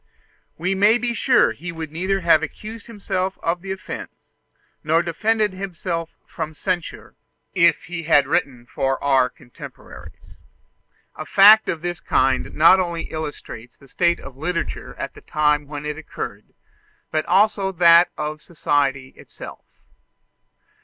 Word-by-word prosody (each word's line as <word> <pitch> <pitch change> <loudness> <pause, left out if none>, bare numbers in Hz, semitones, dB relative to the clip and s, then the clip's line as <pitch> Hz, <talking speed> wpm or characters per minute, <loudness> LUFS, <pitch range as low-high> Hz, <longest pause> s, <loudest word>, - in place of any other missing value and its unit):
We 180 +4 -1
may 205 +4 +4
be 240 0 -2
sure 255 +2 +3
that - - -7
he 175 +1 -6
would 160 -2 -7
neither 190 +4 -1
have 165 -3 +4
accused 215 +7 -8
himself 190 -4 -3
of 170 +1 -1
the 190 0 -6
offence, 190 +1 -8 0.5
nor 165 +2 +2
defended 210 +4 0
himself 175 -3 -4 0.2
from 155 0 -6
censure, 180 +1 -4 0.4
if 170 -3 +3
he 170 0 -6
had 145 -3 +4
written 130 -3 -1
for 135 +1 -1
our 135 -3 +3
contemporaries. 120 - -13 0.8
A - - -6
fact 210 +2 +7
of 165 -1 -3
this 175 0 -3
kind 130 0 0
not 170 +5 +6
only 170 -2 -3
illustrates 145 -6 -7
the 140 - -19
state 170 +5 +1
of 130 - -11
literature 170 +5 -4
at - - -6
the - - -14
time 150 -1 0
when 145 0 -7
it 150 +1 -4
occurred, 160 - -7 0.7
but 155 0 0
also 200 -1 +2
that 170 -1 +6
of 150 0 -4
society 140 -5 -1
itself. - - -12
170 Hz, 145 wpm, -21 LUFS, 150-190 Hz, 0.8 s, fact